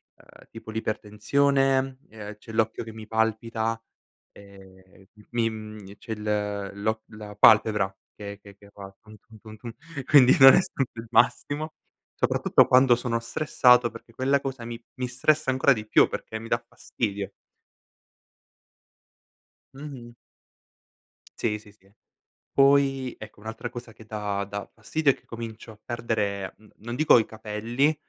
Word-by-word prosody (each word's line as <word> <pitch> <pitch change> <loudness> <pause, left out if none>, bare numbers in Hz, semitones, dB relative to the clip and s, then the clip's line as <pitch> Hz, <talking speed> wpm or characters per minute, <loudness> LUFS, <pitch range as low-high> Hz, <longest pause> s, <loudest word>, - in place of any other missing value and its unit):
ehm, - - -19
tipo 115 -1 -11
l'ipertensione, 130 +5 0
ehm, 105 -1 -10
c'è 110 - -12
l'occhio 110 0 0
che 110 -1 -10
mi 110 -1 -10
palpita, 110 0 -1 0.5
ehm, 95 -1 -17
m 105 - -17
mi, 115 -1 +1
mhmm 110 -2 -9
e 100 - -13
c'è 115 - -10
il 105 -2 -2
l'occ 110 0 0
la 105 -1 -10
palpebra 105 -2 +5 0.2
che 100 -1 -8
che 100 -1 -15
che 100 0 -18
fa, 100 -1 -11
tum 110 0 -15
tum 110 +1 -18
tum 110 0 -12
tum, 115 +1 -9 0.3
quindi 135 -4 +6
non 135 0 +10
è - - +5
stato 135 -7 -3
il 115 - -8
massimo, 150 +5 +1 0.4
soprattutto - - +3
quando 130 -1 +6
sono 120 -1 -2
stressato, 125 0 +3
perché 115 0 -14
quella 135 +3 +1
cosa 135 -3 -6
mi 115 0 -6 0.2
mi 125 - -1
stressa 145 +4 +1
ancora 130 +1 +4
di 110 -3 -7
più, - - +5
perché 110 - -6
mi 115 - -9
dà 115 0 -1
fastidio. 100 -3 -4 2.4
Mh-mh. 135 -4 -10 1.2
Sì, 105 -2 -1
sì, 105 -1 -18
sì. 95 -1 -28 0.6
Poi, 135 -2 +3
ecco, 110 -1 -12
un'altra 110 +2 -6
cosa 120 -2 -9
che 110 - -15
dà 105 -2 -3
dà 100 0 -6
fastidio 155 -3 +1
è - - -3
che - - -25
comincio 115 -1 -8
a 110 - -17
perdere, 105 -5 -3
mhmm, 110 -1 -21
non 120 +3 -6
dico 155 -2 +6
i 110 - 0
capelli, 115 +7 -1
110 Hz, 155 wpm, -26 LUFS, 105-125 Hz, 2.4 s, non